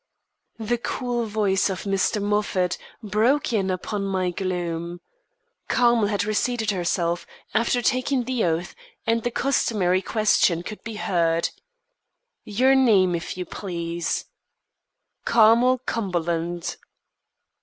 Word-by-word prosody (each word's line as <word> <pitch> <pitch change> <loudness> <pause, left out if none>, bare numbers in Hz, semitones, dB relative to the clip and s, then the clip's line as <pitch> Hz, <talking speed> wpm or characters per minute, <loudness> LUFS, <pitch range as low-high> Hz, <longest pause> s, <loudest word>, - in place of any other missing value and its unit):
The 230 +2 -1
cool 240 -1 -2
voice 205 -2 +1
of 190 -1 -4
Mr. 195 +2 0
Moffat 205 -3 0 0.2
broke 225 +7 +1
in 195 -3 +1
upon 195 +2 -2
my 190 -2 0
gloom. 175 -2 -3 0.7
Carmel 240 -4 +3
had 205 -1 0
reseated 220 +1 0
herself, 175 -2 -1 0.3
after 235 +2 +1
taking 255 +1 +1
the 250 -1 -1
oath, 165 +1 -1 0.3
and 230 0 +1
the 240 - -1
customary 210 -8 +1
question 195 -6 +2
could 215 +3 -8
be 225 -1 -6
heard: 170 -5 +1 0.9
"Your 255 +6 +3
name, 210 -9 +4
if 170 +1 -4
you 180 - -3
please." 170 -2 -3 1.0
"Carmel 235 +3 +5
Cumberland." 175 -7 -2
205 Hz, 110 wpm, -24 LUFS, 180-230 Hz, 1.0 s, Carmel